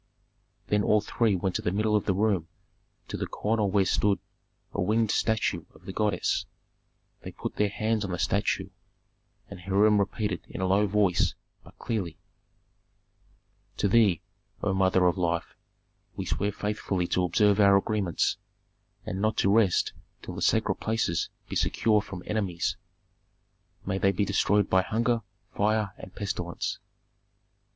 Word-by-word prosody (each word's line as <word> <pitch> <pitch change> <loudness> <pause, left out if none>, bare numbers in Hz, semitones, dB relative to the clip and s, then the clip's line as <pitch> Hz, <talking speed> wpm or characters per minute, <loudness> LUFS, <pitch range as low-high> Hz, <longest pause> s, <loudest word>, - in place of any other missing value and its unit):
Then 105 0 +1
all 105 +1 +4
three 105 0 +1
went 95 0 -1
to - - -5
the 90 - -1
middle 105 +2 +1
of 105 - +1
the 95 - +1
room 100 -5 +1 0.6
to - - -4
the - - -3
corner 105 -1 0
where 95 0 +2
stood 100 +1 +2 0.6
a - - -1
winged 110 +3 +2
statue 105 -7 0
of 80 - -19
the 95 - -6
goddess; 105 -4 0 0.7
they - - -7
put - - -6
their 105 -1 +2
hands 110 +1 -1
on 100 - -4
the 90 - -2
statue, 95 0 0 0.8
and - - -10
Hiram 100 +3 +3
repeated 100 -2 -1
in - - -7
a 95 - 0
low 100 +3 +3
voice, 100 -3 +2 0.3
but - - -17
clearly, 95 -8 -3 1.6
"To - - +2
thee, 100 -5 +3 0.4
O 100 - +1
Mother 95 -1 +3
of 90 +1 +2
Life, 85 -1 -1 0.6
we - - -4
swear 100 +1 -1
faithfully 105 -3 -2
to 90 - +1
observe 100 +4 +3
our 100 -1 +6
agreements, 100 -4 0 0.7
and 95 +2 -4
not 110 +1 +1
to 100 - +3
rest 105 -6 +3 0.3
till - - -7
the - - -6
sacred - - +2
places 110 -7 0 0.2
be - - -6
secure 105 -2 +2
from 95 -4 -8
enemies, 100 -6 -1 1.1
may 95 0 -1
they 95 - +3
be 100 +2 0
destroyed 100 +1 +2
by 95 - +4
hunger, 115 +4 0 0.3
fire, 105 -1 +1
and 95 +2 -11
pestilence. 90 -4 -3
100 Hz, 155 wpm, -27 LUFS, 95-105 Hz, 1.6 s, our